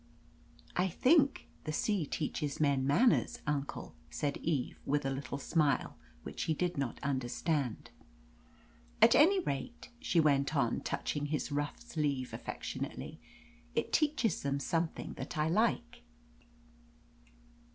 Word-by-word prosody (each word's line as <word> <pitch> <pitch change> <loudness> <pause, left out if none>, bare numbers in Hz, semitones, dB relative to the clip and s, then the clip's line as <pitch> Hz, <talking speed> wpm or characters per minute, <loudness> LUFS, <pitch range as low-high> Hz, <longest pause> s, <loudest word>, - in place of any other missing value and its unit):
"I 180 +1 +2
think 275 - +3 0.2
the 155 - -2
sea 185 0 0
teaches 150 -1 -2
men 140 -3 +2
manners, 235 - +3
uncle," 140 - -3 0.2
said 140 - -2
Eve, 145 -6 -2
with 145 0 0
a 135 - 0
little 135 0 -4
smile 150 0 +1 0.3
which - - -4
he 160 - +1
did 180 +2 -1
not 135 -4 -2
understand. 135 0 -1 1.1
"At - - +8
any 375 +7 +6
rate," 140 - -4
she 245 -9 +1
went 145 -1 +3
on, 120 -5 +2
touching 145 -1 -2
his 150 0 -2
rough 145 0 -2
sleeve 140 -5 -2
affectionately, - - -5 0.6
"it - - -1
teaches 295 -8 +2
them 140 0 -1
something 165 +3 -2
that - - -5
I 155 +1 +2
like." 220 - +1
150 Hz, 125 wpm, -33 LUFS, 140-175 Hz, 1.1 s, At